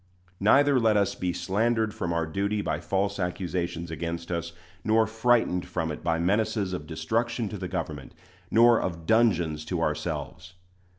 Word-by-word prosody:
Neither 140 Hz, +6 st, +5 dB
let 110 Hz, -2 st, +3 dB
us 100 Hz, -1 st, +2 dB
be 90 Hz, -, -2 dB
slandered 105 Hz, +5 st, 0 dB
from 85 Hz, -, -3 dB
our 85 Hz, -1 st, 0 dB
duty 100 Hz, +5 st, -1 dB
by -, -, -1 dB
false 100 Hz, +1 st, -1 dB
accusations 90 Hz, -2 st, -3 dB
against 85 Hz, +1 st, -4 dB
us, 85 Hz, -1 st, -2 dB, 0.3 s
nor 110 Hz, +1 st, +3 dB
frightened 110 Hz, -4 st, +1 dB
from 80 Hz, -3 st, -2 dB
it 75 Hz, -, -7 dB
by 85 Hz, -1 st, +1 dB
menaces 100 Hz, +2 st, 0 dB
of 75 Hz, -4 st, -5 dB
destruction 110 Hz, +9 st, -1 dB
to 105 Hz, -, -6 dB
the 90 Hz, -, -4 dB
government, 80 Hz, -6 st, -5 dB, 0.3 s
nor 115 Hz, +1 st, +5 dB
of 85 Hz, -3 st, -4 dB
dungeons 85 Hz, -8 st, +2 dB
to 90 Hz, +1 st, -2 dB
ourselves. 75 Hz, +2 st, -3 dB
90 Hz, 160 wpm, -27 LUFS, 85-110 Hz, 0.3 s, Neither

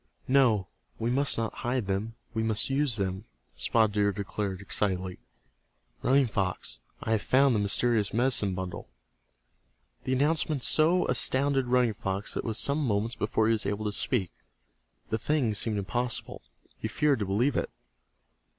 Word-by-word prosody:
"No, 120 Hz, -8 st, +3 dB, 0.3 s
we 115 Hz, +1 st, -1 dB
must 140 Hz, +3 st, +2 dB
not 115 Hz, -2 st, -2 dB
hide 125 Hz, -1 st, -1 dB
them, 100 Hz, +4 st, -2 dB, 0.2 s
we 110 Hz, -, -1 dB
must 110 Hz, +3 st, 0 dB
use 135 Hz, -3 st, +1 dB
them," 95 Hz, 0 st, -3 dB, 0.3 s
Spotted 110 Hz, -, +2 dB
Deer 100 Hz, 0 st, +2 dB
declared, 100 Hz, -1 st, -4 dB
excitedly. 95 Hz, -3 st, -2 dB, 0.8 s
"Running 135 Hz, +1 st, +4 dB
Fox, 90 Hz, -, -2 dB, 0.2 s
I -, -, -2 dB
have 110 Hz, -2 st, +2 dB
found 135 Hz, +3 st, +3 dB
the 110 Hz, -, +1 dB
mysterious 105 Hz, +1 st, +1 dB
medicine 115 Hz, -5 st, +1 dB
bundle!" 90 Hz, -8 st, -6 dB, 1.2 s
The 130 Hz, -, 0 dB
announcement 150 Hz, 0 st, +1 dB
so 165 Hz, +4 st, +4 dB
astounded 135 Hz, +1 st, +2 dB
Running 125 Hz, -2 st, +3 dB
Fox 95 Hz, 0 st, -3 dB
that -, -, -3 dB
it -, -, -4 dB
was 110 Hz, -1 st, -1 dB
some 145 Hz, +4 st, +2 dB
moments 110 Hz, -1 st, 0 dB
before 110 Hz, +1 st, 0 dB
he 110 Hz, -, +3 dB
was 110 Hz, -, -1 dB
able 105 Hz, +1 st, -2 dB
to 105 Hz, -, 0 dB
speak. 100 Hz, -2 st, 0 dB, 0.8 s
The 110 Hz, -, 0 dB
thing 135 Hz, -4 st, 0 dB
seemed 105 Hz, +1 st, 0 dB
impossible. 120 Hz, +5 st, -2 dB, 0.4 s
He -, -, -2 dB
feared 145 Hz, +3 st, +1 dB
to 100 Hz, -, -2 dB
believe 115 Hz, +8 st, +1 dB
it. -, -, -1 dB
110 Hz, 160 wpm, -28 LUFS, 100-130 Hz, 1.2 s, Running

